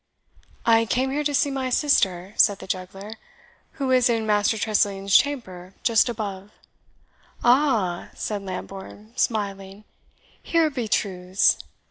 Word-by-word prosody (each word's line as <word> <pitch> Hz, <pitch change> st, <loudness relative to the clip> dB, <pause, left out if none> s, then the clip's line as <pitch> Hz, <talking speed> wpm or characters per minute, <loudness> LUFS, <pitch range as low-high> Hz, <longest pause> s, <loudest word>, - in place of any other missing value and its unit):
"I 230 Hz, 0 st, +4 dB
came 255 Hz, +6 st, 0 dB
here 295 Hz, +2 st, -1 dB
to 290 Hz, 0 st, -1 dB
see 285 Hz, 0 st, +2 dB
my 265 Hz, -1 st, -2 dB
sister," 195 Hz, -, +1 dB
said 205 Hz, -2 st, +4 dB
the -, -, -10 dB
juggler, 195 Hz, +3 st, -6 dB, 0.6 s
"who 270 Hz, -3 st, -2 dB
is 255 Hz, -1 st, +4 dB
in 225 Hz, -2 st, 0 dB
Master 210 Hz, +1 st, +2 dB
Tressilian's 200 Hz, -2 st, 0 dB
chamber, 190 Hz, -10 st, 0 dB
just 230 Hz, +1 st, +3 dB
above." 200 Hz, -4 st, -5 dB, 0.9 s
"Aha!" 240 Hz, -9 st, +2 dB
said 210 Hz, -2 st, -4 dB
Lambourne, 195 Hz, +3 st, -8 dB
smiling, 200 Hz, -3 st, -2 dB, 0.6 s
"here 330 Hz, -2 st, +1 dB
be 245 Hz, -5 st, -3 dB
truths! 185 Hz, -2 st, +1 dB
215 Hz, 125 wpm, -24 LUFS, 195-250 Hz, 0.9 s, I